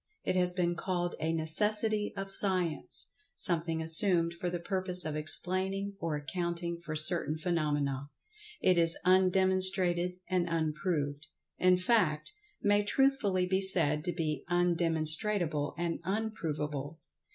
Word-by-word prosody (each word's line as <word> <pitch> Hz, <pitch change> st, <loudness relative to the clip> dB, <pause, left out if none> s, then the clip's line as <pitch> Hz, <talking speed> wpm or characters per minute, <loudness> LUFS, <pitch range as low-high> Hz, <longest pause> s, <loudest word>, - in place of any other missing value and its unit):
It -, -, -2 dB
has 180 Hz, -1 st, +3 dB
been 175 Hz, -2 st, -1 dB
called 175 Hz, 0 st, -4 dB
a 160 Hz, -, -3 dB
"necessity 210 Hz, +6 st, +2 dB
of 195 Hz, 0 st, -6 dB
Science"—something 175 Hz, -, 0 dB
assumed 170 Hz, 0 st, +3 dB
for 175 Hz, +1 st, -5 dB
the 175 Hz, 0 st, -5 dB
purpose 185 Hz, -1 st, +1 dB
of 155 Hz, -1 st, -5 dB
explaining 190 Hz, +6 st, -1 dB
or 165 Hz, -2 st, -4 dB
accounting 170 Hz, +3 st, -5 dB
for 165 Hz, -2 st, -8 dB
certain 155 Hz, 0 st, +4 dB
phenomena. 145 Hz, -4 st, -3 dB, 0.5 s
It 180 Hz, -2 st, +2 dB
is 165 Hz, 0 st, +4 dB
undemonstrated 185 Hz, -1 st, +4 dB
and 180 Hz, -2 st, -2 dB
unproved—in 160 Hz, +1 st, -3 dB
fact, 180 Hz, -, -1 dB, 0.3 s
may 205 Hz, 0 st, +2 dB
truthfully 205 Hz, -5 st, 0 dB
be 190 Hz, +1 st, -1 dB
said 160 Hz, -6 st, +1 dB
to 175 Hz, -, -2 dB
be 160 Hz, -3 st, -4 dB
undemonstrable 165 Hz, -2 st, 0 dB
and 170 Hz, -1 st, -4 dB
unprovable. 160 Hz, -8 st, -5 dB
175 Hz, 120 wpm, -29 LUFS, 160-190 Hz, 0.5 s, certain